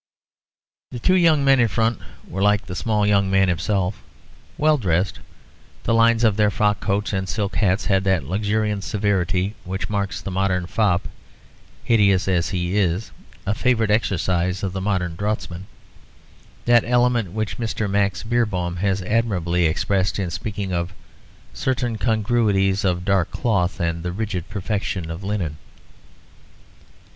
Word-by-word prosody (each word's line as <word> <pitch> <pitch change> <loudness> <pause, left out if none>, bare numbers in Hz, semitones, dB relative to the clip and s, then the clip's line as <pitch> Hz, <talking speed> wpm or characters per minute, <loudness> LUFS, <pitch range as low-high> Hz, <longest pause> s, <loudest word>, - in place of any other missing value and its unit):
The 125 - -7
two 155 +10 +2
young 165 -6 +4
men 135 -1 +5
in 120 - +4
front 115 0 0 0.3
were 95 - -4
like 105 0 +3
the 90 - -7
small 105 0 0
young 100 -1 +3
man 95 0 +3
himself, 95 +2 -1 0.6
well 150 -1 +3
dressed. 90 -3 0 0.6
The - - +1
lines 115 0 +4
of 110 -3 +3
their 105 -1 +4
frock 105 -1 +1
coats 105 +1 -1
and 95 -1 -2
silk 105 -2 -2
hats 95 -2 +1
had 95 -1 +2
that 95 -5 +2
luxuriant 105 +5 -1
severity 95 -1 0
which 95 +3 -4
makes 100 -2 -2
the 95 - -6
modern 90 -1 0
fop, 95 -1 +1 0.8
hideous 100 -5 +3
as 90 -3 +1
he 90 0 -2
is, 95 +1 0 0.3
a 100 - +1
favourite 115 -2 +1
exercise 95 -3 0
of 95 -2 -2
the 95 - -3
modern 95 -4 -1
draughtsman; 95 -2 -3 1.0
that 120 -1 +5
element 120 -4 +2
which 110 +1 -3
Mr. 110 -2 -2
Max 100 -2 0
Beerbohm 105 -7 -1
has 95 0 0
admirably 90 -6 +1
expressed 95 +3 0
in 95 -4 -2
speaking 100 0 -4
of 85 +2 -2 0.6
"certain 120 -3 -1
congruities 105 -4 +1
of 90 -2 0
dark 95 -3 +2
cloth 100 -6 0
and 85 -1 -1
the 90 +1 -3
rigid 95 -3 -4
perfection 100 -4 -3
of 85 +4 -7
linen." 95 -7 -2
100 Hz, 150 wpm, -22 LUFS, 90-110 Hz, 1.0 s, men